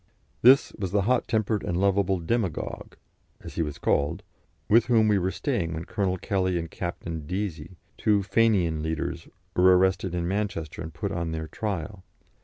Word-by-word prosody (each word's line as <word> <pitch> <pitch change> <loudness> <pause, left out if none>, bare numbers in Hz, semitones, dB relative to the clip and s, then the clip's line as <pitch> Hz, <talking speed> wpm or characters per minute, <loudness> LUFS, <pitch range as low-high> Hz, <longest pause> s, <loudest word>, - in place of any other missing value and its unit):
This 130 +3 +6
was 95 -3 -2
the 100 -1 +2
hot 125 +4 +1
tempered 110 -2 0
and 85 - -2
lovable 100 -1 +2
"demagogue," 90 -1 -3 0.5
as - - -9
he - - -1
was 75 -3 -3
called, 75 +4 0 0.4
with 115 +3 +5
whom 115 -3 +4
we 105 -2 +3
were 90 +1 0
staying 95 - -2
when 80 +1 -5
Colonel 95 -3 -1
Kelly 95 -2 0
and 85 -1 -4
Captain 85 -3 -5
Deasy, 90 -2 -4 0.2
two 105 -2 +2
Fenian 95 -6 +2
leaders, 80 0 -3 0.3
were 90 0 +6
arrested 95 -1 +1
in 85 -1 -1
Manchester 95 -6 -3
and 80 0 -6
put - - -4
on 85 -1 -2
their 80 0 -4
trial. 100 0 -4
95 Hz, 170 wpm, -26 LUFS, 85-105 Hz, 0.5 s, This